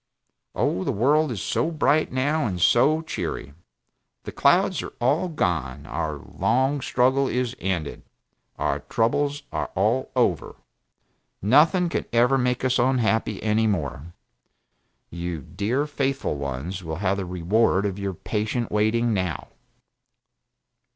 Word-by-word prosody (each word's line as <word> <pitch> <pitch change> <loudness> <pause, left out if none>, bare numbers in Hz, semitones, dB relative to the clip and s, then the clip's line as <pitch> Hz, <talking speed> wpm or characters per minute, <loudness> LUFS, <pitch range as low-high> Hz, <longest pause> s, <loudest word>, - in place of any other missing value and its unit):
Oh, 95 - 0
the - - 0
world 145 +7 +2
is 105 -6 -4
so - - 0
bright, 155 -1 +1
now, 145 +2 0
and 90 -3 -3
so 140 - +4
cheery; 70 - -5 0.7
the - - -6
clouds - - +3
are - - -8
all 145 +9 +2
gone, 85 - -2
our - - -3
long 135 +3 0
struggle 130 +2 +2
is 125 -1 -1
ended, 90 -6 -3 0.6
our - - -1
troubles 145 +6 0
are - - -3
all 110 +7 +1
over. 115 - 0 0.8
Nothing 155 - +4
can 170 - -2
ever 125 +3 +3
make 125 0 0
us 130 0 +2
unhappy 115 -4 +1
any 110 +1 +2
more. 80 -5 -3 1.0
You 85 -3 -5
dear 125 - -1
faithful 135 - -2
ones 70 +7 -5
will 80 -1 -4
have 95 +2 0
the 95 - -3
reward 95 +3 +1
of 100 -1 -3
your 100 -2 -3
patient 110 +5 -2
waiting 110 +2 +2
now. 95 -5 -2
115 Hz, 130 wpm, -24 LUFS, 95-130 Hz, 1.0 s, so